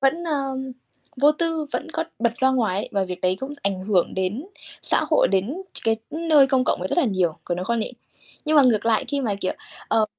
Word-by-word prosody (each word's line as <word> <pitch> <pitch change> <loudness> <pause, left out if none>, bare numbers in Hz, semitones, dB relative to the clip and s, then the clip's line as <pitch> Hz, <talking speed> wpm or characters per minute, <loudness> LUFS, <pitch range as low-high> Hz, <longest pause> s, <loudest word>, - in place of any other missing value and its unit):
vẫn, 275 +6 +2
ơ, 275 -5 -1 0.6
vô 285 +4 +5
tư, 325 -1 -1
vẫn 325 - -3
có 325 - -2
bật 235 -2 +2
loa 265 - +6
ngoài 225 -8 +1
ấy - - -3
và 195 -1 +1
việc 180 -1 -6
đấy 185 0 +1
cũng 270 +2 -4
ảnh 195 -2 -1
hưởng 185 -2 +1
đến 190 - -2 0.4
xã - - +2
hội, 310 - +4
đến 200 - -1
ch - - -6
cái 225 -1 +3
nơi 310 -3 +4
công 260 -1 +2
cộng - - 0
rất 185 - -1
là 345 - +4
nhiều, 185 -8 +1
có 175 - -1
đúng 180 +1 -4
không 235 +3 0
nhỉ? 220 - -3 0.5
Nhưng 310 0 +2
mà 290 - +8
ngược 230 -4 +3
lại 225 -1 +3
khi 285 -1 -1
mà, 220 -6 0
kiểu, 185 - 0 0.4
ờ, 220 - +3
245 Hz, 235 wpm, -23 LUFS, 195-290 Hz, 0.6 s, mà